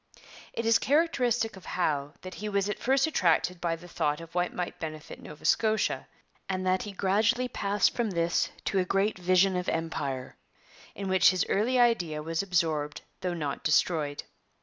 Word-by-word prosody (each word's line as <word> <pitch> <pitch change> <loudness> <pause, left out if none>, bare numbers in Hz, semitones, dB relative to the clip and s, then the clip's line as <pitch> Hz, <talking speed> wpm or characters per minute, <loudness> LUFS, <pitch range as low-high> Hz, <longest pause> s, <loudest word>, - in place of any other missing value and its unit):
It 230 - -3
is 230 0 +5
characteristic 250 -7 +1
of 190 - -13
Howe 145 -4 0
that 185 0 -8
he 210 +1 -5
was 200 -1 0
at 210 - -3
first 270 +3 +3
attracted 180 - +1
by 170 -1 0
the 170 +2 -13
thought 150 -3 -1
of 165 0 -11
what 180 0 0
might 180 -1 -5
benefit 155 -1 -7
Nova 150 - -11
Scotia, 220 -1 +1 0.4
and 185 -1 -2
that 185 0 +2
he 210 - -6
gradually 210 +6 +1
passed 205 -3 +1
from 235 -3 0
this 170 -2 +1 0.2
to 195 - +1
a - - +3
great 195 +2 0
vision 185 +1 +3
of 180 0 -1
Empire, 145 -5 -3 0.6
in 200 - -5
which 190 -1 +5
his 185 -1 +1
early 235 +6 +2
idea 175 -11 +2
was 165 +1 -1
absorbed 160 -6 -1 0.2
though 180 -2 -2
not 145 -4 -4
destroyed. 150 -2 +1
185 Hz, 175 wpm, -28 LUFS, 165-210 Hz, 0.6 s, is